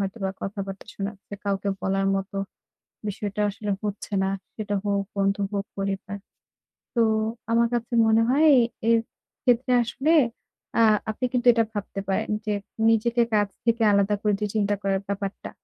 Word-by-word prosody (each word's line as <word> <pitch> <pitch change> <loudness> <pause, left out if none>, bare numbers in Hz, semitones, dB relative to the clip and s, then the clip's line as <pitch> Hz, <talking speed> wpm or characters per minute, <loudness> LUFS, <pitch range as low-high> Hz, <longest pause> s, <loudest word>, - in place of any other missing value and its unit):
হয়তোবা 195 0 -2
কথাবার্তা 195 -1 -5
শোনাচ্ছে। 200 0 -6
কাউকে 200 0 -1
বলার 195 0 0
মতো 195 +1 -3 0.7
বিষয়টা 205 0 -3
আসলে 210 0 -4
হচ্ছে 205 0 -4
না, 190 - +1 0.3
সেটা 205 -2 -2
হোক 200 -1 0
বন্ধু, 195 0 +1
হোক 200 0 -1
পরিবার। 195 0 -3 0.8
তো 235 - +2 0.5
আমার 235 +1 +4
কাছে 240 +1 -2
মনে 220 +1 +4
হয়, 295 +5 +4 0.4
এ - - +5
এর 230 - +6 0.5
ক্ষেত্রে 250 +1 +3
আসলে 270 +7 0 0.7
আ - - +7 0.3
আপনি 215 +4 -4
কিন্তু 250 -1 0
এটা 230 -1 +3
ভাবতে 205 -2 -4
পারেন 195 - 0 0.2
যে, 210 - +1 0.4
নিজেকে 235 +2 +3
কাজ 205 -1 +3 0.2
থেকে 230 0 +2
আলাদা 200 +1 +3
করে 210 -1 +2
দিয়ে 210 -1 -2
চিন্তা 205 -1 +2
করার 195 -1 +1
যে - - -17
ব্যাপারটা। 200 0 -4
205 Hz, 155 wpm, -25 LUFS, 195-230 Hz, 0.8 s, আ